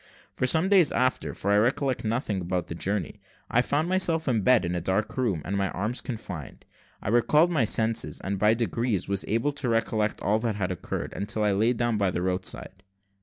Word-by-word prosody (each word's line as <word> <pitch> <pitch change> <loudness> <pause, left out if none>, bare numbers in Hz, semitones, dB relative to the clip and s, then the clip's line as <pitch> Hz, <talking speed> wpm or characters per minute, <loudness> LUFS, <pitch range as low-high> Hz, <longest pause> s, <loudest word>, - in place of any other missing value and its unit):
For 130 - -1
some 160 +7 +3
days 190 -6 +5
afterwards, 130 0 -1
for 100 - 0
I 105 - +5
recollect 130 +3 0
nothing 110 -3 -1
about 90 0 -2
the - - -4
journey, 100 +4 -3 0.3
I 125 - +4
found 145 +5 0
myself 175 -4 +2
in 115 -5 +1
bed 125 -2 +4
in 85 - -2
a 90 - -2
dark 95 +5 -1
room, 105 - -1
and 100 - -2
my 100 -1 0
arms 105 +8 -3
confined. 100 - -7 0.4
I - - -2
recalled 150 +9 +3
my 145 -9 +2
senses, 110 +1 +1
and 100 0 -3
by 105 +2 +4
degrees 115 -2 -1
was 100 -1 -1
able 115 +7 0
to 140 -3 -3
recollect 110 -2 0
all 105 +2 +1
that 110 -2 -2
had 95 -3 -2
occurred, 90 - -5
until 105 +2 -1
I 105 - +2
laid 110 +5 +1
down 120 -2 0
by 100 -2 +2
the 90 0 -2
roadside. 95 0 -2
110 Hz, 210 wpm, -26 LUFS, 100-125 Hz, 0.4 s, days